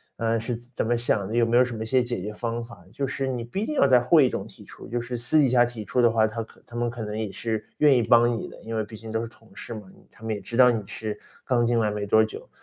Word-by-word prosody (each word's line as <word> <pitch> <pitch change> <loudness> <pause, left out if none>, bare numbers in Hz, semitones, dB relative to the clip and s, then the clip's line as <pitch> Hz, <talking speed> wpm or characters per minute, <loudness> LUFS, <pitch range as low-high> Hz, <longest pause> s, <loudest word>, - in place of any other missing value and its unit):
呃， 115 0 0
是 115 +2 -3
怎 120 +1 -13
怎 - - 0
么 120 - +2
想 110 -4 0
的？ 110 - -4
有 120 -1 +4
没 115 +1 +2
有 125 - +6
什 125 -1 -6
么 110 - -4
一 - - -5
些 130 +3 +3
解 120 -5 -3
决 105 +3 -5
方 115 +2 -3
法？ 100 -7 -14
就 140 - -2
是 135 0 -3
你 125 -3 -2
不 120 +11 -5
一 215 - -1
定 305 - -3
要 - - +5
在 130 -2 +6
会 140 +4 +5
议 - - +2
中 - - -4
提 - - -15
出， - - -12
就 120 +1 -2
是 120 +1 -4
私 120 +7 +1
底 140 -3 +4
下 120 0 +5
提 120 -3 -6
出 125 - +1
的 120 - +6
话， 110 -1 +3
他 110 +1 -3
可 110 - -13
他 - - -19
们 120 0 0
可 115 -1 -6
能 105 0 -4
也 110 -2 -2
是 110 -1 -3
愿 150 -2 +6
意 125 - +3
帮 120 +1 +4
你 - - -6
的。 - - -13
因 115 0 -5
为 110 - 0
毕 110 +1 -11
竟 110 +1 -9
都 110 0 -1
是 115 - -4
同 115 -1 -20
事 - - -8
嘛， 110 - -6
你 - - -22
他 - - -19
们 110 0 -2
也 105 - -4
知 115 - -7
道 125 -1 +7
你 115 -2 -1
是 105 -1 -5 0.3
刚 120 -3 +2
进 120 0 +2
来 105 -2 +1
没 105 -1 -3
多 110 +2 +5
久， 110 - -7
115 Hz, 360 characters per minute, -25 LUFS, 110-120 Hz, 0.3 s, 道